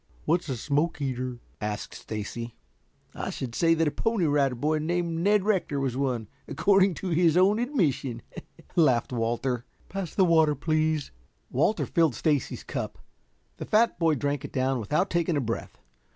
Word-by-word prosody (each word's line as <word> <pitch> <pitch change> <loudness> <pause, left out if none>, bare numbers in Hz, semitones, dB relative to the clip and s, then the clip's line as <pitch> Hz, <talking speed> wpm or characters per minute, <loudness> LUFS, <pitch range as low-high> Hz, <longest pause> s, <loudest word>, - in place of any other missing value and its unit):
"What's 170 0 +1
a 130 - -2
smoke 145 +8 0
eater?" 130 -3 -3 0.2
asked 105 0 -4
Stacy. 115 +2 -6 0.6
"I - - -4
should 125 -3 -5
say 165 +5 +3
that 165 -1 +2
a - - +1
Pony 225 -2 0
Rider 140 -3 +2
Boy 155 +5 0
named 170 +1 -1
Ned 205 +3 +3
Rector 185 -9 +1
was 135 -3 -1
one, 130 -5 -1 0.2
according 195 +3 +3
to 190 - -4
his 170 0 +3
own 195 +4 +4
admission," 150 - 0 0.5
laughed 130 -7 +3
Walter. 120 +1 -1 0.3
"Pass 195 -4 -5
the 190 - +5
water, 160 -3 +4
please." 155 0 0 0.4
Walter 165 - +1
filled 165 - +2
Stacy's 150 -5 0
cup. - - -4 0.6
The - - -5
fat 220 -3 +2
boy 165 -2 +3
drank 145 +1 -2
it 145 - -7
down 130 -1 0
without 155 - 0
taking 170 -2 +1
a - - +2
breath. 115 -3 -4
150 Hz, 165 wpm, -27 LUFS, 130-170 Hz, 0.6 s, the